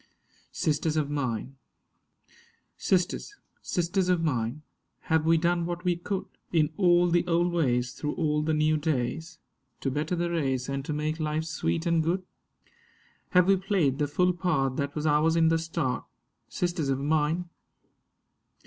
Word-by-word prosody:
SISTERS 155 0 0
OF 145 -2 0
MINE 130 -2 -3 1.2
SISTERS, 190 - 0 0.3
sisters 180 +1 0
of 175 -2 +2
mine, 130 -1 -1 0.5
have 160 0 +3
we 165 0 +5
done 170 +1 +1
what 175 0 -4
we 180 -1 +2
could 185 +3 -3 0.3
In 160 -2 +2
all 175 -2 +4
the 175 0 +3
old 175 +1 +2
ways, 125 -6 +1
through 150 +3 -4
all 150 -3 0
the 155 0 0
new 155 0 +2
days, 160 +3 -2 0.4
To 135 - -1
better 155 +6 -1
the 170 0 -1
race 135 -6 -1
and 140 0 -3
to - - -3
make 155 +2 -2
life 155 0 -1
sweet 150 - -2
and 170 -1 +3
good? 175 +4 0 1.1
Have 180 -2 +5
we 195 0 +5
played 180 -8 +1
the 145 - +1
full 180 +5 +2
part 160 -7 0
that 140 0 -2
was 150 0 -2
ours 155 +2 +3
in 165 -1 +4
the 165 0 +2
start, 135 -6 -2 0.5
Sisters 170 -5 -1
of 135 - +1
mine? 155 +4 0
160 Hz, 155 wpm, -27 LUFS, 145-175 Hz, 1.2 s, we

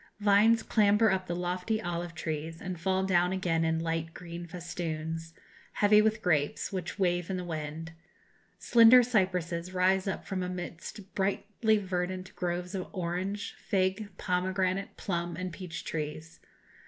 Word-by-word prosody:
Vines 210 +2 +5
clamber 210 0 +4
up 190 -1 +1
into 175 - -1
the - - -4
lofty 180 +5 -1
olive 175 -3 -4
trees, 160 +1 -4
and 180 -2 -5
fall 190 +1 +1
down 180 -1 +3
again 175 -3 0
in 160 0 +1
light 165 0 -2
green 170 -1 -7
festoons, 165 -1 -5 0.4
heavy 210 0 +5
with 220 0 +1
grapes, 150 +1 +1
which 185 0 -4
wave 175 -2 +1
in 190 - -1
the 180 - -3
wind. 160 -1 -5 0.7
Slender 235 +1 +7
cypresses 185 -6 0
rise 185 +1 +3
up 190 - -3
from 190 -2 -3
amidst 180 +2 -6
brightly 210 +3 +1
verdant 185 -1 -3
groves 180 +1 -3
of 185 -2 -3
orange, 190 +2 -3
fig, 190 +2 0
pomegranate, 185 +1 -1
plum, 170 -3 -2
and 185 -1 -4
peach 170 -2 -6
trees. 155 +1 -5
180 Hz, 145 wpm, -30 LUFS, 170-195 Hz, 0.7 s, Slender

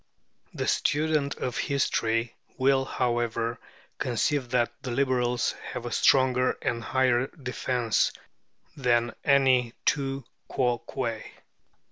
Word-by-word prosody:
The - - -2
student 150 -1 +1
of 125 -3 -3
history 115 -4 0 0.2
will, 135 0 +3
however, 120 -1 -1 0.4
conceive 125 +2 0
that 120 -1 +1
the 130 - -5
Liberals 125 -1 +1 0.2
have 120 - -5
a 120 - -4
stronger 130 +1 +3
and 115 -1 -2
higher 130 0 +2
defence 125 -5 -1 0.6
than 120 -3 +1
any 130 -4 +3
tu 135 -2 0 0.2
quoque. 120 -2 -1
125 Hz, 100 wpm, -27 LUFS, 120-135 Hz, 0.6 s, will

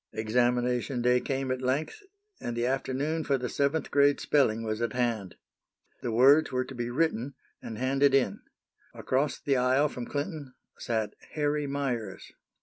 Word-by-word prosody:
Examination 120 +3 0
day 125 0 +4
came 135 0 -2
at 130 0 -2
length, 140 - -1 0.4
and 120 -1 -4
the 120 - 0
afternoon 135 +5 -1
for 140 -2 +1
the 125 -1 -3
seventh 140 +4 -1
grade 145 0 +4
spelling 115 -6 +2
was 110 0 -3
at 115 -2 -1
hand. 115 -7 -1 0.7
The 120 - -2
words 135 +7 +5
were 130 0 0
to 135 - -9
be 120 -1 -3
written, 140 -1 -1 0.3
and 110 - -7
handed 135 +2 +3
in. 125 -8 +1 0.6
Across 140 +3 -1
the 140 -2 +1
aisle 130 +4 +3
from 125 -3 -6
Clinton 145 -3 -5 0.2
sat 110 -3 -2 0.2
Harry 150 -1 0
Meyers. 125 -8 -3
130 Hz, 155 wpm, -28 LUFS, 120-140 Hz, 0.7 s, words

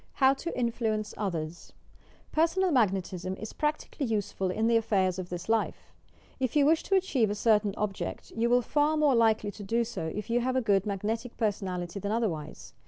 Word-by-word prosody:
HOW 265 -1 +4
TO 335 +5 -5
INFLUENCE 225 -3 -1
OTHERS 170 -5 -4 0.6
Personal 340 +4 +2
Magnetism 190 - 0
is 215 +2 -8
practically 300 -2 -2
useful 205 -3 -1
in 220 +5 0
the 230 0 +3
affairs 190 -5 +1
of 180 -1 -5
this 175 0 -6
life. 225 0 -1 0.5
If 255 0 -1
you 290 -2 +5
wish 320 +2 +4
to 390 - 0
achieve 280 - +2
a 205 - -1
certain 210 -2 +2
object, 205 -2 -4
you 230 +1 0
will 245 +1 +4
be - - -15
far 300 +1 +2
more 300 -3 +4
likely 220 -3 +3
to 205 - -11
do 230 +4 +1
so 195 -8 -4
if 210 +6 -5
you 240 - +3
have 255 +1 0
a - - +4
good 200 -3 +2
magnetic 220 +4 -3
personality 190 -4 -2
than 200 +1 -3
otherwise. 155 - -3
220 Hz, 190 wpm, -29 LUFS, 195-250 Hz, 0.6 s, you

